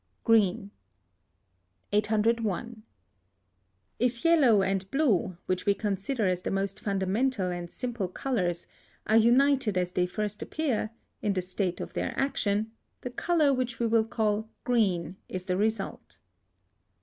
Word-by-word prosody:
GREEN. 210 Hz, -2 st, +3 dB, 1.2 s
801. 220 Hz, +1 st, 0 dB, 1.2 s
If 245 Hz, +3 st, 0 dB
yellow 265 Hz, -12 st, +5 dB
and 190 Hz, 0 st, -1 dB
blue, 210 Hz, -, +1 dB
which 185 Hz, +1 st, -2 dB
we 200 Hz, -, +4 dB
consider 210 Hz, +4 st, -1 dB
as 180 Hz, -1 st, +1 dB
the -, -, -3 dB
most 195 Hz, 0 st, -1 dB
fundamental 200 Hz, +1 st, 0 dB
and 175 Hz, -1 st, -5 dB
simple 235 Hz, -4 st, -3 dB
colours, 180 Hz, -4 st, -2 dB, 0.4 s
are 220 Hz, -, +2 dB
united 245 Hz, -2 st, +4 dB
as 180 Hz, -1 st, 0 dB
they 180 Hz, 0 st, +1 dB
first 210 Hz, +2 st, -3 dB
appear, 270 Hz, -9 st, -1 dB, 0.3 s
in 205 Hz, -2 st, +1 dB
the 185 Hz, -, 0 dB
first 180 Hz, +1 st, -7 dB
state 185 Hz, -2 st, -1 dB
of -, -, -6 dB
their -, -, -3 dB
action, 220 Hz, -5 st, 0 dB, 0.3 s
the 250 Hz, -, -5 dB
colour 310 Hz, 0 st, +2 dB
which 250 Hz, -2 st, -2 dB
we 230 Hz, -1 st, +3 dB
call 220 Hz, -2 st, -1 dB
green 190 Hz, -8 st, +1 dB
is 185 Hz, -1 st, -5 dB
the 185 Hz, -2 st, 0 dB
result. 210 Hz, +1 st, -2 dB
210 Hz, 135 wpm, -28 LUFS, 190-240 Hz, 1.2 s, yellow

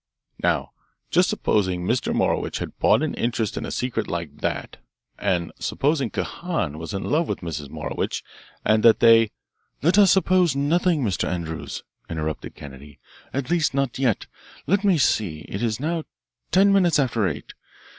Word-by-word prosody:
Now -, -, +1 dB, 0.4 s
just -, -, +4 dB
supposing 95 Hz, -4 st, 0 dB
Mr. 120 Hz, +5 st, 0 dB
Morowitch -, -, 0 dB
had -, -, -6 dB
bought -, -, +4 dB
an -, -, -1 dB
interest 115 Hz, -2 st, -1 dB
in -, -, -4 dB
a -, -, -5 dB
secret 120 Hz, -3 st, -2 dB
like 85 Hz, -4 st, -4 dB
that -, -, -3 dB, 0.4 s
and 85 Hz, -2 st, 0 dB
supposing 140 Hz, -3 st, 0 dB
Kahan 130 Hz, -, -3 dB
was 80 Hz, -, -6 dB
in 95 Hz, -, -3 dB
love 160 Hz, +2 st, +1 dB
with -, -, -3 dB
Mrs. 80 Hz, -5 st, -5 dB
Morowitch -, -, -3 dB, 0.4 s
and 110 Hz, 0 st, +4 dB
that 115 Hz, -1 st, +6 dB
they 115 Hz, -1 st, +6 dB, 0.3 s
" -, -, -46 dB
"Let 175 Hz, +6 st, +4 dB
us 200 Hz, -2 st, +7 dB
suppose 185 Hz, -5 st, +3 dB
nothing, 160 Hz, +2 st, +2 dB
Mr. 100 Hz, -6 st, 0 dB
Andrews," 85 Hz, -3 st, -4 dB, 0.3 s
interrupted 80 Hz, -2 st, -4 dB
Kennedy. 70 Hz, +1 st, -11 dB, 0.3 s
"At 140 Hz, +3 st, -3 dB
least 165 Hz, -5 st, +2 dB
not 135 Hz, -2 st, -1 dB
yet. 125 Hz, -6 st, +1 dB, 0.4 s
Let 200 Hz, +6 st, +2 dB
me 195 Hz, -4 st, +4 dB
see; 95 Hz, -, +1 dB
it 95 Hz, -, -5 dB
is 110 Hz, -3 st, 0 dB
now 160 Hz, +2 st, -2 dB, 0.4 s
ten 195 Hz, +2 st, +5 dB
minutes 180 Hz, -5 st, +4 dB
after 120 Hz, -7 st, +1 dB
eight. 75 Hz, -, -5 dB
120 Hz, 165 wpm, -24 LUFS, -, 0.4 s, us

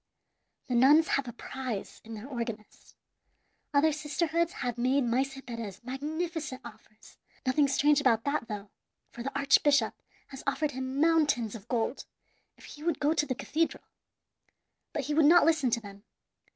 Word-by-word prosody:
The 250 Hz, -, -4 dB
nuns 285 Hz, +7 st, +5 dB
have 275 Hz, -2 st, 0 dB
a -, -, -4 dB
prize 245 Hz, -3 st, -6 dB
in 225 Hz, 0 st, -8 dB
their 215 Hz, +2 st, -8 dB
organist. 230 Hz, -5 st, -7 dB, 0.8 s
Other 295 Hz, +2 st, +4 dB
sisterhoods 315 Hz, +3 st, -1 dB
have 250 Hz, -, -3 dB
made 255 Hz, +3 st, +2 dB
Maese 265 Hz, +3 st, 0 dB
Perez 230 Hz, -6 st, -7 dB
magnificent 300 Hz, +2 st, -4 dB
offers; 215 Hz, -1 st, -15 dB, 0.3 s
nothing 280 Hz, +3 st, +3 dB
strange 290 Hz, +1 st, +3 dB
about 230 Hz, -5 st, +3 dB
that, 285 Hz, -4 st, -1 dB
though, 205 Hz, -1 st, -6 dB, 0.4 s
for 240 Hz, -, -9 dB
the 260 Hz, -, -2 dB
very 280 Hz, 0 st, -3 dB
archbishop 280 Hz, -3 st, +4 dB, 0.4 s
has 270 Hz, -1 st, -9 dB
offered 295 Hz, +1 st, 0 dB
him 260 Hz, +1 st, -4 dB
mountains 295 Hz, -9 st, +2 dB
of 220 Hz, -2 st, -10 dB
gold 240 Hz, +2 st, -2 dB, 0.5 s
if -, -, -15 dB
he 295 Hz, -, -12 dB
would 330 Hz, -1 st, -1 dB
go 295 Hz, +2 st, +2 dB
to 295 Hz, -2 st, 0 dB
the 255 Hz, -, -1 dB
cathedral. 325 Hz, +6 st, -1 dB, 1.1 s
But 300 Hz, -3 st, -3 dB
he 295 Hz, -, -2 dB
would 310 Hz, 0 st, +4 dB
not 345 Hz, +1 st, +7 dB
listen 315 Hz, -5 st, +3 dB
to 235 Hz, 0 st, +1 dB
them. 200 Hz, -2 st, -12 dB
270 Hz, 165 wpm, -29 LUFS, 235-300 Hz, 1.1 s, not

